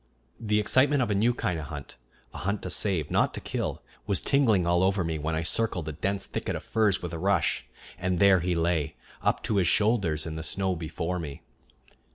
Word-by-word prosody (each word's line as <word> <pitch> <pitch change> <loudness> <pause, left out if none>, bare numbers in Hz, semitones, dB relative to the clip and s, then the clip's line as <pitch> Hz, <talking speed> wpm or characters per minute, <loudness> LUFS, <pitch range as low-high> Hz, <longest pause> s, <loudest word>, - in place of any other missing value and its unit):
The 105 -2 +1
excitement 130 +6 +3
of 115 - -1
a - - +3
new 110 +5 +3
kind 100 -8 -2
of 75 - -5
hunt, 75 -3 -8 0.4
a - - -7
hunt 100 +2 -2
to 95 - -3
save, 90 -8 0
not - - +2
to - - -4
kill, - - -3 0.2
was 100 -3 +2
tingling 115 -10 +3
all 85 +1 +3
over 95 0 +2
me 80 -2 -2
when 80 +2 -2
I 80 - -1
circled 90 -3 -1
a - - -2
dense 95 +6 -2
thicket - - -3
of - - -5
firs 105 -5 +1
with 85 -1 -4
a 85 - -4
rush, 95 -3 +1 0.3
and 95 -1 0
there 95 +1 +6
he 90 +1 0
lay, 85 -3 0 0.3
up - - 0
to 105 - 0
his 90 -3 +3
shoulders 95 -7 +2
in 80 -1 -5
the - - -4
snow 95 +2 0
before 80 +2 -3
me. 75 -4 -7
90 Hz, 215 wpm, -27 LUFS, 80-100 Hz, 0.4 s, there